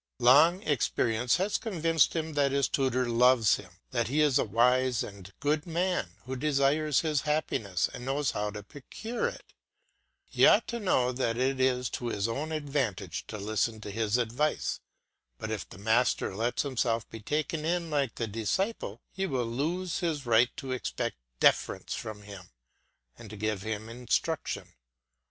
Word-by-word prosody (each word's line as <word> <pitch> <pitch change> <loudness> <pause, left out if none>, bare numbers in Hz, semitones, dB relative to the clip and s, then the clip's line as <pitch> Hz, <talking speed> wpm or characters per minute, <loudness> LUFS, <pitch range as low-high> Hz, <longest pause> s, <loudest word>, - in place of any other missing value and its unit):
Long 155 +10 +6
experience 120 -4 +1
has 195 +3 0
convinced 165 - +2
him 160 -1 -2
that 140 -2 +2
his 140 -1 +2
tutor 130 -2 0
loves 120 -1 +4
him, 90 -4 -13 0.2
that 120 -2 0
he 140 +6 0
is 145 -3 +4
a - - +3
wise 125 +3 +2
and 100 -2 -10
good 150 +3 0
man 170 - -1
who 130 +1 -4
desires 145 +1 +2
his 155 -3 0
happiness 115 - 0
and - - -7
knows 135 +1 0
how 105 0 -2
to 105 0 -7
procure 220 - -4
it. - - -9 0.7
He - - +4
ought - - +5
to 235 - -3
know 130 - +2
that 120 -2 -1
it 130 +1 0
is 125 -1 +2
to 120 - -4
his 105 -2 -1
own 140 +7 -3
advantage 135 - -2
to 110 - -6
listen 110 +2 -1
to 105 - -6
his 110 +1 0
advice. 125 +6 -1 0.6
But 110 - -5
if 110 - -4
the - - -12
master 110 -1 +1
lets 115 +4 0
himself 120 -4 -1
be 115 - -7
taken 150 +7 -2
in 170 0 -1
like 140 -5 0
the 115 - -2
disciple, 115 - -2
he 195 +1 -2
will 130 -6 -1
lose 165 +10 -2
his 160 -6 -2
right 120 +1 +4
to 135 - -5
expect 130 - -3 0.2
deference - - +2
from 105 -1 -6
him, 100 -3 -11 0.7
and 110 - -10
to 105 - -9
give 105 -1 -1
him 110 +1 -4
instruction. 120 +1 -2
125 Hz, 170 wpm, -29 LUFS, 110-150 Hz, 0.7 s, Long